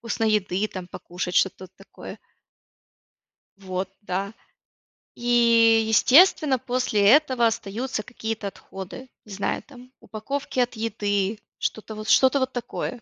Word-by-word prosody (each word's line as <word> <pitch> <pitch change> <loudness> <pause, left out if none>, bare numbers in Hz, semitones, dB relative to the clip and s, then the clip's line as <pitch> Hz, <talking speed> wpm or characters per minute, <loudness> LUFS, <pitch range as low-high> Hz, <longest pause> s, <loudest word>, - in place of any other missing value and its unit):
Вкусной 225 -1 -1
еды 200 0 0
там 185 -3 -8
покушать, 180 0 -6
что-то 190 0 +1
вот 185 - -16
такое. 195 - -11 1.4
Вот, 185 -1 -4
да. 195 +1 -3 0.8
И 230 -2 +4
естественно 275 - +5
после 250 -4 -1
этого 260 -3 +4
остаются 225 +1 -3
какие-то 220 -3 -5
отходы, 195 +6 -9
не 210 - -15
знаю, 195 +1 -3
там, 255 -2 -16
упаковки 260 +5 -5
от 245 0 0
еды, 205 -2 -2 0.2
что-то 220 0 -4
вот 215 0 -7
что-то 265 +4 +5
вот 260 0 -1
такое 245 0 -5
225 Hz, 125 wpm, -24 LUFS, 200-250 Hz, 1.4 s, естественно